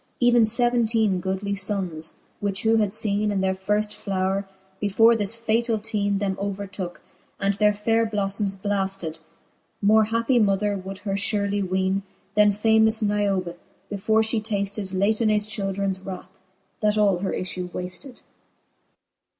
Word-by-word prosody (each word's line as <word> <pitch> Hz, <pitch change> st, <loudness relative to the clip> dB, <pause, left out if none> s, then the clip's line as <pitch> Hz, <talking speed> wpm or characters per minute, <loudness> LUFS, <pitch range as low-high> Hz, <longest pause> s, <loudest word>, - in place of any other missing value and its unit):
Even 245 Hz, -1 st, +5 dB
feventeene 230 Hz, -3 st, +2 dB
goodly 190 Hz, +2 st, -2 dB
ibnnes; 190 Hz, -5 st, -2 dB, 0.2 s
which 200 Hz, -2 st, -2 dB
who 225 Hz, 0 st, +4 dB
had 210 Hz, -2 st, +2 dB
feene 210 Hz, 0 st, +1 dB
In 200 Hz, -1 st, 0 dB
their 190 Hz, 0 st, +1 dB
firft 210 Hz, +2 st, -1 dB
flowre^ 195 Hz, 0 st, -1 dB, 0.3 s
before 225 Hz, +3 st, +4 dB
this 215 Hz, +1 st, -2 dB
fatall 230 Hz, 0 st, 0 dB
teene 205 Hz, -2 st, 0 dB
Them 195 Hz, -1 st, -1 dB
overtooke, 195 Hz, -2 st, -4 dB, 0.4 s
and 200 Hz, 0 st, +1 dB
their 210 Hz, +1 st, +3 dB
faire 225 Hz, +2 st, +1 dB
blolTomes 200 Hz, -1 st, -1 dB
blafted, 195 Hz, -5 st, -2 dB, 0.6 s
More 215 Hz, +1 st, +5 dB
happie 230 Hz, +3 st, +1 dB
mother 205 Hz, 0 st, +2 dB
would 190 Hz, 0 st, -6 dB
her 195 Hz, -, -1 dB
furely 200 Hz, 0 st, 0 dB
weene, 190 Hz, +1 st, 0 dB, 0.3 s
Then 210 Hz, -1 st, +6 dB
famous 220 Hz, +1 st, +3 dB
Niobe, 200 Hz, -4 st, 0 dB, 0.4 s
before 220 Hz, +2 st, +2 dB
Ihe 220 Hz, 0 st, +1 dB
tafted 200 Hz, -2 st, -2 dB
Latonaes 210 Hz, +2 st, +1 dB
childrens 195 Hz, -2 st, -2 dB
wrath, 190 Hz, -1 st, -8 dB, 0.5 s
that 210 Hz, 0 st, +2 dB
all 200 Hz, -4 st, +3 dB
her 195 Hz, -, -2 dB
iflue 180 Hz, -1 st, -4 dB
wafted. 180 Hz, +10 st, -7 dB
205 Hz, 135 wpm, -24 LUFS, 195-220 Hz, 0.6 s, Then